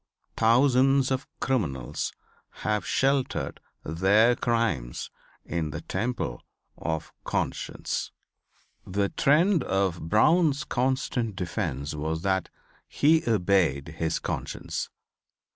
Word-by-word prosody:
Thousands 130 +3 +4
of 130 +1 -1
criminals 70 - -1 0.5
have 105 -3 0
sheltered 135 0 0 0.2
their 100 +9 +4
crimes 115 - -1 0.3
in 80 -3 -2
the - - -5
temple 120 - -3 0.3
of 80 -1 -4
Conscience. - - -2 0.7
The 100 +1 -1
trend 165 +3 +3
of 95 -4 -1
Brown's 150 - +4
constant 125 -5 -1
defence 80 - -3
was 80 +2 -3
that 95 -2 0 0.4
he 160 +2 +3
obeyed 90 - +2
his 80 -1 0
conscience. - - -4
105 Hz, 95 wpm, -27 LUFS, 80-130 Hz, 0.7 s, Thousands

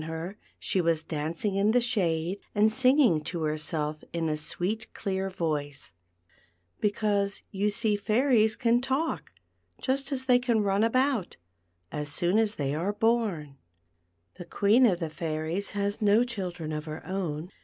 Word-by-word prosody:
her, 160 +4 -5 0.2
she 190 - -1
v/as 165 -2 +1
dancing 160 +6 -2
in 200 +2 +2
the 245 - +5
shade 190 -6 0 0.2
and 215 +1 +4
singing 255 - +4
to 165 +1 -4
herself 155 0 -1
in 165 -1 -1
a 155 - 0
sweet 185 +8 -2
clear 190 -1 -2
voice, 150 -6 -3 0.9
because 205 -1 0
you 200 +2 0
see 215 0 +1
fairies 220 +1 +3
can 240 0 +2
talk, 265 +5 -2 0.5
just 275 +2 -1
as 260 -1 -1
they 250 -1 +5
can 235 -4 +1
run 200 +1 +2
about, 255 -3 +1 0.5
as 150 0 -3
soon 175 +7 +2
as 220 -1 +1
they 140 -1 -1
are 175 +7 -1
born. 205 - 0 0.8
The 175 - -7
Queen 210 +8 +4
of 180 -5 +1
the 165 -3 -3
Fairies 160 +4 -3
has 200 +2 -1
no 210 +3 +5
children 180 -9 -5
of 150 0 -4
her 155 0 -7
own. 180 -3 -3
195 Hz, 155 wpm, -28 LUFS, 160-225 Hz, 0.9 s, the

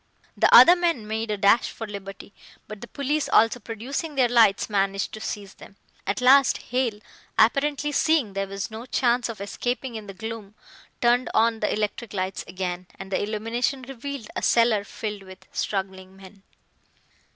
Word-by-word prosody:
The - - +3
other 350 - +10
men 335 -10 0
made 220 +1 -3
a 210 - -1
dash 200 +4 +3
for 225 - -7
liberty, 200 -1 -9 0.3
but 215 -1 -9
the 235 - -8
police 285 +3 -2
also 225 +2 +4
producing 260 +8 -5
their 255 -2 +4
lights, 225 -4 +4
managed 195 -1 -1
to 215 - -7
seize 200 -2 -6
them. 200 - -15 0.3
At 200 - -1
last 265 +1 +5
Hale, 245 -4 -2 0.4
apparently 285 +5 +2
seeing 300 -8 +1
there 195 0 -2
was 195 +2 -5
no 225 +3 -8
chance 245 -1 +1
of 225 - -7
escaping 245 +5 -3
in 215 -2 -7
the 195 - -9
gloom, 220 -1 -7 0.5
turned 245 +1 +3
on 225 0 +3
the 210 - 0
electric 210 +1 -3
lights 185 0 -3
again, 180 -1 -5
and 195 0 -9
the 190 - 0
illumination 230 +5 -2
revealed 270 0 -7
a - - -2
cellar 230 -3 +3
filled 210 0 -6
with 190 -1 -14
struggling 190 -1 -4
men. 195 +1 -15
220 Hz, 170 wpm, -24 LUFS, 200-250 Hz, 0.5 s, other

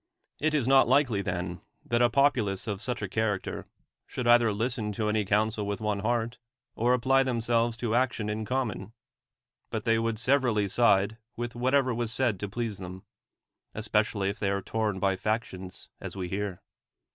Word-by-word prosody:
It 155 +1 +1
is 135 -5 +1
not 135 -2 +6
likely, 125 -5 +3
then, 90 -2 -3 0.2
that 120 0 +1
a 120 - +5
popu 140 -2 +3
lace 95 -1 -3
of 105 -2 -3
such 120 -2 -3
a - - -1
character 105 -1 -2 0.4
should 125 - -4
either 120 -2 +6
listen 110 0 -2
to 105 +1 -1
any 105 0 +1
counsel 105 +1 +1
with 100 0 -2
one 105 -2 -1
heart, 115 +2 -1 0.4
or 120 +2 +3
apply 135 +2 +3
themselves 120 -2 +1
to 115 -2 -2
action 120 -3 +1
in 105 +1 -2
common; 110 -4 -3 0.8
but - - -4
they 115 -1 +3
would 115 -1 -1
severally 120 -4 +2
side 100 0 +3 0.2
Avith 120 0 -3
whatever 130 +1 +2
was 115 -1 -2
said 120 -5 +1
to 105 - -4
please 115 -2 -3
them; 95 0 -8 0.7
es 105 0 -4
pecially 105 -2 +1
if 100 - -5
they 100 - 0
are 100 -1 -1
torn 110 -2 -1
by 95 0 +2
factions, 95 -3 -4
as - - -7
we 90 -2 -4
hear. 100 -1 -4
110 Hz, 180 wpm, -28 LUFS, 100-120 Hz, 0.8 s, not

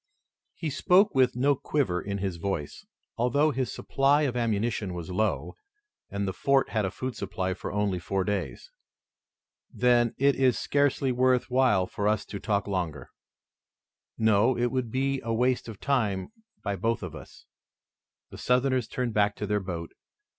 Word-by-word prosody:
He 160 -3 -3
spoke 185 +8 +4
with 130 -2 +3
no 140 +4 +3
quiver 125 -10 -1
in 100 0 -4
his 95 -3 -3
voice, 85 -5 -4 0.3
although 140 +6 +2
his 130 -2 -2
supply 140 +2 +2
of 130 -4 -1
ammunition 110 -4 -1
was 85 +1 -6
low, 90 -5 -1 0.6
and 100 0 -2
the 95 - -2
fort 135 +6 +2
had 110 -3 0
a - - 0
food 130 +5 -5
supply 95 -3 -3
for 90 - -6
only 100 -3 0
four 95 +3 -1
days. 105 - -4 1.0
"Then 120 -2 +2
it 140 +1 +3
is 130 -3 +3
scarcely 140 -2 +1
worth 125 0 +2
while 125 -8 +3
for 100 +2 -3
us 105 -1 +1
to 100 - -7
talk 100 -1 0
longer." 85 -9 -3 1.1
"No, 110 +3 +3
it 120 0 +1
would 130 -3 -1
be 135 +2 -1
a 115 - -3
waste 125 +1 +1
of 105 -3 -9
time 110 -9 0 0.3
by 100 -1 -1
both 115 +5 -1
of - - -6
us." - - -12 0.9
The - - -10
Southerners 125 -1 +1
turned 125 -2 -3
back 105 -1 +2
to 105 - -4
their 105 0 0
boat. 85 -3 -5
115 Hz, 165 wpm, -27 LUFS, 100-130 Hz, 1.1 s, spoke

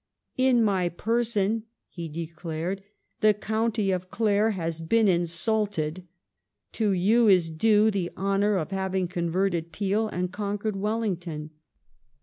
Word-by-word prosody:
" - - -55
In 240 -3 +4
my 190 -4 +1
pei 225 +7 0
son," 220 -1 0 0.2
he 170 -2 -7
declared, 165 +3 -4 0.2
" - - -47
the 215 -1 +5
County 220 0 0
of 185 0 -3
Clare 215 0 +2
has 165 -5 -3
been 220 +7 +3
insulted. 175 -1 0 0.6
To 220 -2 0
you 215 +6 +3
is 180 -5 +4
due 215 +6 +4
the 190 -4 -2
honour 200 +2 +1
of 180 0 -2
having 190 -1 -1
converted 175 -1 -1
Peel 205 +5 0
and 180 -2 -3
conquered 205 +1 -2
Wellington." 185 -7 -3
195 Hz, 135 wpm, -26 LUFS, 175-215 Hz, 0.6 s, the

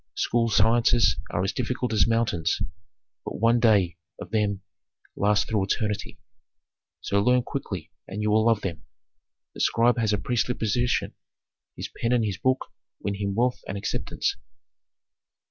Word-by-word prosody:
School 115 -1 +1
sciences 115 +2 +4
are 85 - -1
as 95 - 0
difficult 125 -1 -2
as 105 -5 +4
mountains, 115 -7 +1 0.6
but - - -5
one 115 +3 +3
day 100 -7 +3 0.2
of 90 - -9
them 105 -3 0 0.5
lasts 105 -1 +2
through 105 -3 0
eternity. 105 +1 -2 0.8
So 100 0 +1
learn 125 +3 +3
quickly - - -5 0.2
and 100 - -6
you 105 0 +1
will 110 +1 +4
love 115 -3 +3
them. 85 -5 -5 0.7
The - - -11
scribe 120 +1 +3
has 110 -2 +1
a 105 - +2
princely 125 +2 0
position; 120 +3 0 0.6
his - - -5
pen 115 +1 -1
and 120 -3 +2
his 100 -4 -3
book 130 0 0 0.3
win 100 - -2
him 100 -1 -3
wealth 125 +2 +1
and 100 - -4
acceptance." 100 - -2
110 Hz, 150 wpm, -26 LUFS, 100-120 Hz, 0.8 s, sciences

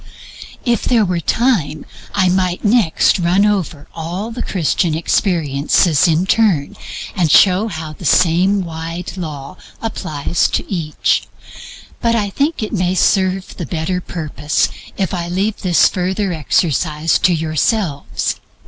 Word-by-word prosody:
If 235 -3 +1
there 230 -4 +3
were 180 -2 -1
time 170 - 0 0.3
I 190 -2 +3
might 180 +1 0
next 205 -5 +3
run 180 +4 +3
over 180 -8 -1
all 175 +7 -5
the 245 +1 -5
Christian 170 -2 0
experiences 160 -1 +2
in 165 +2 +2
turn, 190 -9 +2 0.4
and 175 -5 +1
show 190 +6 +5 0.3
the - - -12
same 185 +4 +3
wide 165 +1 -6
law 155 -2 -7 0.2
applies 155 -7 -1
to - - -1
each; 165 -6 -1 0.7
but 230 -1 +2
I 205 -3 -1
think 285 - -1
it 215 - -4
may 185 -2 0
serve 190 0 +1
the 175 - -4
better 180 +2 -2
purpose 155 -3 -1 0.3
if 190 -3 -1
I 170 -2 -2
leave 195 +4 -1
this 180 -3 +3
further 185 +1 -1
exercise 155 0 +1
to 185 - +3
yourselves. 160 0 -1
180 Hz, 130 wpm, -17 LUFS, 160-200 Hz, 0.7 s, show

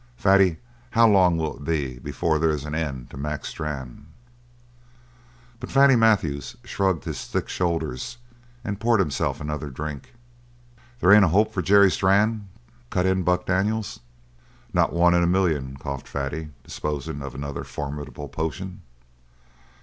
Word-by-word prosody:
Fatty, 95 -3 +4 0.3
how 115 -1 +5
long 95 -5 +4
will 80 -2 -2
it 70 - -11
be 70 -5 -2
before 80 +4 -1
there's 75 -2 0
an 75 - -5
end 70 -6 -3
to - - -9
Mac 75 +1 -4
Strann?" 70 -2 -6 1.5
But - - -7
Fatty 135 -1 +6
Matthews 110 - +2
shrugged 95 - 0
his - - -5
thick - - -2
shoulders 80 - -2 0.5
and 100 -1 -4
poured 115 -1 +3
himself 75 -8 0
another 75 0 -4
drink. 75 - -7 0.9
"There 90 - +5
ain't 105 -1 +8
a - - +2
hope 100 +7 +2
for 90 - -1
Jerry 100 0 +6
Strann?" 100 +2 +2 0.4
cut 90 -1 0
in 95 0 +2
Buck 90 0 +1
Daniels. 100 +4 -1 0.7
"Not - - +3
one 85 +1 +4
in 85 - +4
a 85 - +3
million," 80 -8 0
coughed 70 -1 -6
Fatty, 70 +3 -4
disposing 75 -1 -4
of 70 -2 -7
another 70 +1 -5
formidable 75 0 -6
potion. 90 +6 -5
80 Hz, 145 wpm, -24 LUFS, 75-95 Hz, 1.5 s, ain't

